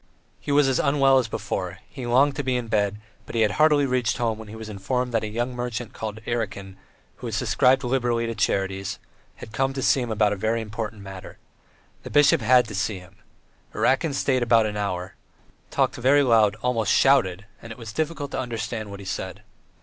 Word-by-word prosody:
He - - -4
was 145 -1 +4
as 130 -2 +1
unwell 135 -1 +4
as 125 - -1
before; 95 -3 -4
he 130 -3 -7
longed 135 +4 +3
to 145 - -1
be 130 -1 0
in 120 -2 -5
bed, 105 -1 0 0.3
but - - -8
he 115 - +2
had 105 -2 +3
hardly 150 -2 +5
reached 125 -4 0
home 115 -2 -1
when 110 - -9
he 105 - -9
was 110 -1 -8
informed 120 +5 -2
that 115 - +1
a - - -2
young 120 +4 -3
merchant 120 -1 -4
called 110 0 -6
Erakin, 100 -5 -3 0.4
who - - -6
subscribed 130 +2 +2
liberally 120 -2 0
to 115 - -3
charities, 95 -2 -1 0.4
had - - -11
come 135 +4 0
to 135 - -4
see 135 - +3
him 120 - -3
about 105 -1 +2
a - - -2
very 110 +4 0
important 105 -1 -6
matter. 95 -1 -10 0.6
The - - -9
bishop 145 -2 +4
had 125 +1 +4
to - - -7
see 105 0 -1
him. 90 +1 -15 0.6
Erakin 140 +2 +1
stayed 130 -2 +1
about 115 -2 +4
an 105 -1 -3
hour, 95 -3 -3 0.6
talked - - 0
very 140 +4 +4
loud, 110 -5 +4
almost 120 -3 +1
shouted, 100 -9 +3 0.2
and 115 - -10
it 115 - -8
was 115 -2 -8
difficult 150 0 -3
to - - -3
understand 115 -3 -4
what 100 0 -8
he - - -10
said. - - -5
115 Hz, 205 wpm, -24 LUFS, 105-130 Hz, 0.6 s, hardly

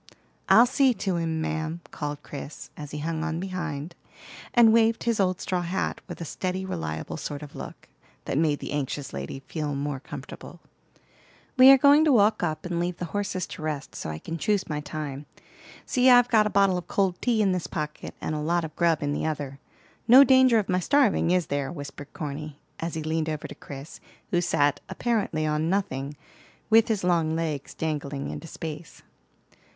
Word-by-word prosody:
"I'll 235 - +8
see 260 0 +3
to 190 -5 -1
him, 160 -1 -1
ma'am," 160 +1 -3
called 145 -1 -5
Chris, 145 +1 -8
as 150 -1 -8
he 150 - -6
hung 160 +1 -2
on 165 0 -2
behind, 170 -4 -4 0.6
and 230 -2 +6
waved 225 0 +3
his 230 -2 0
old 185 -2 +1
straw 180 -1 -1
hat, 175 +2 -2
with - - -8
a 170 - -5
steady, 185 +4 -3
reliable 80 - -4
sort 145 -1 -5
of 145 - -11
look, - - -9 0.4
that - - -2
made 150 0 +2
the - - -5
anxious 145 -1 -3
lady 70 - -5
feel 150 +1 -4
more 140 -1 -3
comfortable. 145 - -10 1.0
"We 260 0 +9
are 270 - +10
going 285 +3 +6
to 305 - +4
walk 215 -3 +4
up, 160 -1 -2
and 175 -1 -2
leave 175 0 -2
the 180 - -4
horses 195 -3 -2
to - - -8
rest; 150 -3 -4
so - - -5
I 80 - -4
can 165 - -6
choose 210 0 0
my 150 -1 -2
time. 150 -1 -6 0.6
See, 255 0 +3
I've 245 -1 +7
got 215 -3 +4
a - - -1
bottle 195 -3 +3
of 175 - -11
cold 190 -3 0
tea 240 -3 +1
in 195 - +3
this 180 -2 -2
pocket, 150 -2 -5
and - - -3
a 155 - -2
lot 170 +2 0
of 155 - -9
grub 165 -3 +2
in 145 0 0
the 155 - -1
other. 140 -3 -4 0.5
No 255 +4 +10
danger 260 -3 +5
of 210 -3 0
my 185 -1 +1
starving, 225 -3 +3
is 180 -1 +2
there?" 140 0 -2
whispered 145 -2 -8
Corny, 150 0 -6 0.2
as 165 0 -3
he 160 - -3
leaned 160 0 -1
over 155 -1 -4
to - - -9
Chris, 140 +1 -10 0.3
who 175 - +2
sat, 145 -4 +2
apparently, 210 -10 -1
on 155 +1 0
nothing, 145 -7 -2 0.5
with 225 0 +6
his 215 -4 -1
long 165 -3 +2
legs 155 -4 -3
dangling 145 -3 -3
into 165 - -7
space. 160 0 -8
165 Hz, 195 wpm, -26 LUFS, 150-195 Hz, 1.0 s, are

